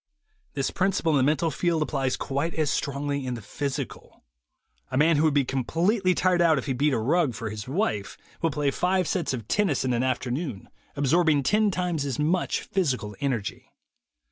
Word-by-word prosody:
This 135 Hz, -2 st, -1 dB
principle 190 Hz, -4 st, +1 dB
in 150 Hz, -, +3 dB
the -, -, +3 dB
mental 160 Hz, +1 st, +1 dB
field 165 Hz, 0 st, +1 dB
applies 135 Hz, -4 st, -1 dB
quite 140 Hz, +5 st, -2 dB
as 155 Hz, -3 st, +1 dB
strongly 140 Hz, 0 st, -2 dB
in 125 Hz, -1 st, -3 dB
the 115 Hz, -, -7 dB
physical. 140 Hz, +5 st, -5 dB, 0.7 s
A 130 Hz, -, -2 dB
man 155 Hz, +2 st, +4 dB
who 155 Hz, -, +3 dB
would 155 Hz, -, +3 dB
be 140 Hz, -2 st, +3 dB
completely 180 Hz, -, +1 dB
tired 180 Hz, -1 st, +2 dB
out 165 Hz, -3 st, +4 dB
if -, -, -3 dB
he 135 Hz, -, -1 dB
beat 145 Hz, +4 st, +2 dB
a 130 Hz, -, +1 dB
rug 135 Hz, +2 st, +1 dB
for 115 Hz, -2 st, -4 dB
his 105 Hz, +1 st, -6 dB
wife, 130 Hz, -, -1 dB, 0.2 s
will 165 Hz, -, +2 dB
play 145 Hz, -1 st, 0 dB
five 180 Hz, +3 st, +1 dB
sets 175 Hz, -5 st, -1 dB
of 115 Hz, -5 st, -5 dB
tennis 185 Hz, -11 st, +1 dB
of 130 Hz, -, +1 dB
an 120 Hz, 0 st, +1 dB
afternoon, 130 Hz, -, -2 dB, 0.3 s
absorb 155 Hz, +4 st, +3 dB
ing 145 Hz, -2 st, +3 dB
ten 210 Hz, +8 st, +3 dB
times 180 Hz, -5 st, -1 dB
as 140 Hz, -3 st, -3 dB
much 165 Hz, +5 st, 0 dB
physical 130 Hz, -, -1 dB
energy. 125 Hz, -8 st, -3 dB
145 Hz, 195 wpm, -26 LUFS, 130-170 Hz, 0.7 s, man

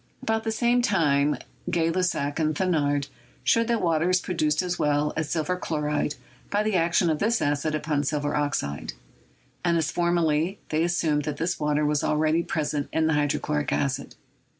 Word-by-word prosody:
About 220 Hz, 0 st, 0 dB
the 225 Hz, -, 0 dB
same 240 Hz, +2 st, +2 dB
time 150 Hz, -, +2 dB, 0.3 s
Gay 165 Hz, -1 st, +1 dB
Lussac 165 Hz, -5 st, -1 dB
and 155 Hz, -1 st, +1 dB
Thenard 145 Hz, -5 st, +1 dB, 0.4 s
showed 230 Hz, 0 st, +3 dB
that 235 Hz, -1 st, 0 dB
water 165 Hz, 0 st, +2 dB
is 185 Hz, 0 st, +3 dB
produced 155 Hz, -3 st, 0 dB
as 180 Hz, -1 st, -3 dB
well 150 Hz, 0 st, +1 dB
as 160 Hz, -2 st, -2 dB
silver 165 Hz, +2 st, 0 dB
chloride 150 Hz, -3 st, -1 dB, 0.3 s
by 205 Hz, +1 st, +1 dB
the 215 Hz, -2 st, 0 dB
action 170 Hz, +1 st, +2 dB
of 155 Hz, -, -1 dB
this 225 Hz, +2 st, +2 dB
acid 145 Hz, +2 st, 0 dB
upon 150 Hz, -1 st, -1 dB
silver 145 Hz, +1 st, -1 dB
oxide; 145 Hz, -, -2 dB, 0.7 s
and, 170 Hz, -1 st, +2 dB
as 160 Hz, -1 st, 0 dB
formerly, 170 Hz, +1 st, +1 dB
they 155 Hz, +1 st, +1 dB
assumed 160 Hz, -4 st, +1 dB
that 150 Hz, -2 st, -3 dB
this 165 Hz, +3 st, -1 dB
water 150 Hz, 0 st, +1 dB
was 150 Hz, -1 st, +1 dB
already 155 Hz, +2 st, +2 dB
present 150 Hz, -3 st, -2 dB
in 160 Hz, -, +1 dB
the 160 Hz, -, +2 dB
hydrochloric 150 Hz, 0 st, 0 dB
acid. 135 Hz, -2 st, -1 dB
155 Hz, 175 wpm, -26 LUFS, 150-175 Hz, 0.7 s, showed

